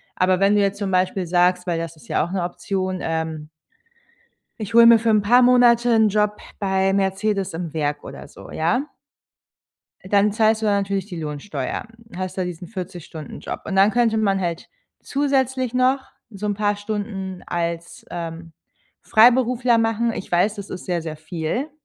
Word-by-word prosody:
Aber 185 0 +2
wenn 195 +1 +4
du 205 - +4
jetzt 200 0 0
zum 200 -2 -3
Beispiel 185 0 +1
sagst, 180 +1 +2
weil 170 -3 -1
das 165 0 -5
ist 155 - -18
ja - - +1
auch 175 - -5
'ne 190 -2 -1
Option, 185 +1 -3
ähm 160 -1 -3 1.1
„Ich 215 +1 -6
hol 235 0 +8
mir 230 -1 +8
für 230 0 0
'n 215 -1 +4
paar 245 +5 +5
Monate 245 -1 +5
'n 220 -2 +4
Job 210 0 +1 0.2
bei 190 -1 +1
Mercedes 195 0 0
im 165 -1 -5
Werk." 150 -2 -2
oder - - -9
so, - - -13
ja 240 - 0 1.2
dann 200 +2 +2
zahlst 220 0 +2
du - - -1
da 205 - +3
natürlich 195 -1 -1
die 180 -5 -7
Lohnsteuer, 150 +1 -5 0.3
hast 185 +1 -5
da 185 - 0
diesen 180 0 -6
40 180 -4 -7
Stunden-Job. 155 -3 -8
Und 195 - -3
dann 195 +2 +5
könnte 230 -1 +2
man 200 -3 +1
halt 170 -2 -4 0.3
zusätzlich 265 -3 0
noch 255 +2 +1 0.2
so 210 -1 -7
'n 205 - 0
paar 205 0 0
Stunden 200 -3 -5
als, 170 0 -4
ähm, 165 -1 -7 0.5
Freiberufler 245 +1 +4
machen. 225 +1 0
Ich - - -7
weiß, 180 +5 +2
das 200 -2 -8
ist 185 - -7
sehr, 175 -2 -1
sehr 160 -1 -6
viel. 165 - -4
195 Hz, 180 wpm, -22 LUFS, 175-220 Hz, 1.2 s, hol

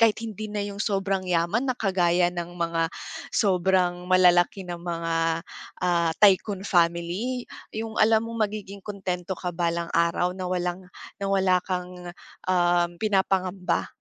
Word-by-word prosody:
kahit 225 -1 +4
hindi 215 -1 -6
na 210 0 -2
'yong 200 0 -7
sobrang 195 -2 0
yaman 175 +9 +1
na - - 0
kagaya 180 -3 +2
ng 175 0 -5
mga 165 -1 0 0.4
sobrang 180 -2 +2
malalaki 180 +1 +4
na 175 - -4
mga, 170 -1 -3 0.7
ah, 170 -2 +2
tycoon 200 0 +4
family. 175 +8 0 0.3
'Yong 220 0 -5
alam 220 +1 +4
mong 230 -2 0
magiging 200 -2 -8
kuntento 190 -3 -4
ka 180 -1 -3
balang 170 0 -1
araw, 170 +2 +2
na 185 -1 -4
walang, 180 0 -2 0.4
na - - 0
wala 190 -2 +3
kang, 180 -1 -5 0.4
um, 175 -1 +3
pinapangamba. 190 -3 0
185 Hz, 135 wpm, -25 LUFS, 175-200 Hz, 0.7 s, kahit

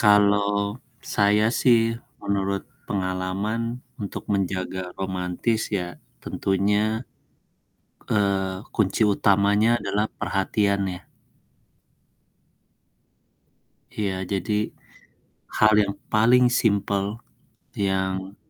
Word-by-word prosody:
Kalau 100 +1 +3 0.3
saya 105 +1 +4
sih 115 -2 +4 0.3
menurut 100 -1 -1 0.2
pengalaman 100 +5 -2 0.2
untuk 100 - -6
menjaga 95 -2 -2
romantis 95 +4 -1
ya 90 -4 -4 0.2
tentunya, 105 +4 0 1.0
eee, 95 -2 0
kunci 105 0 +1
utamanya 105 +3 +3
adalah 105 +2 0
perhatian 100 +1 0
ya. 90 - -9 2.9
Iya 100 -3 -1 0.2
jadi 100 +2 -1 1.1
hal 110 0 +6
yang 100 0 -2 0.2
paling 120 +4 +5 0.2
simple 100 -2 +1 0.7
yang, 95 0 -1
100 Hz, 75 wpm, -24 LUFS, 95-105 Hz, 2.9 s, hal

